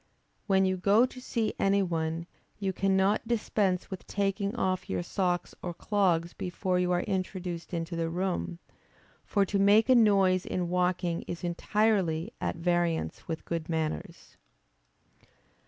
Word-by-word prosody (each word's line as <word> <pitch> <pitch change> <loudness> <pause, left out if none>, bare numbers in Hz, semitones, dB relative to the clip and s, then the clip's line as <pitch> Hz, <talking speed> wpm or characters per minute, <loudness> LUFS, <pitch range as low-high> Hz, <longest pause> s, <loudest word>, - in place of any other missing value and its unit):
When 190 -1 +4
you 185 0 +1
go 205 +6 +4
to 255 0 -9
see 230 -3 -1
any 195 0 +3
one, 165 -1 -2 0.3
you 195 -2 -2
cannot 195 +3 +2
dispense 205 -5 0
with 190 - -7
taking 200 +1 -1
off 185 -5 -1
your 90 -1 -1
socks 180 - -1
or 175 -1 -5
clogs 175 -5 +1
before 180 0 -1
you 180 0 +1
are 175 0 +1
introduced 185 -3 -3
into 170 0 -3
the 165 -1 -1
room. 180 0 -2 0.7
For 200 -2 +1
to 200 +1 -1
make 205 +4 +5
a - - +8
noise 195 -5 +4
in 180 -2 -2
walking 180 -1 0
is 170 - -5
entirely 175 -2 +1
at - - -1
variance 170 -1 -1
with 165 -1 -4
good 165 -1 -3
manners. 160 -2 -4
185 Hz, 145 wpm, -29 LUFS, 170-200 Hz, 0.7 s, a